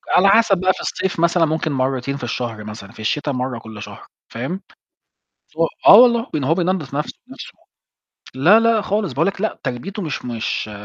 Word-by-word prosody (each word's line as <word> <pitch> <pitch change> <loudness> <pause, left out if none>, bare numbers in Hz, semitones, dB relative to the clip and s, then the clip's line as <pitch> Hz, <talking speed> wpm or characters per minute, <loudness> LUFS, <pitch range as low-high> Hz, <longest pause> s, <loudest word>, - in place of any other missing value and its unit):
على 195 +2 +5
حسب 220 -3 +4
بقى 185 +1 +2
في - - -9
الصيف 190 -3 -3
مثلًا 170 0 +3
ممكن 160 0 -2
مرتين 130 0 -1
في 130 - -10
الشهر 120 -3 -4
مثلًا 105 -1 -9
في 120 - -18
الشتاء 145 +6 -1
مرة 125 -2 -3
كل 110 -2 -10
شهر، - - -10 0.2
فاهم، 135 +12 -5 1.0
و 165 - +2 0.2
آه - - +10
والله، 235 0 +5
لإن 145 -4 -1
هو 160 +5 +2
بينضّف 175 -6 -2
نَفْسه 150 - -2
بنَفْسه، - - -10 0.8
لا، 180 +12 +5
لا، 230 -2 +2
خالص 205 -7 -1
باقول 155 +6 +1
لك 195 -1 -2
لأ 220 - -2
تربيته 180 - -5
مش 155 -6 -4
مش 115 -2 -3
155 Hz, 190 wpm, -20 LUFS, 125-190 Hz, 1.0 s, آه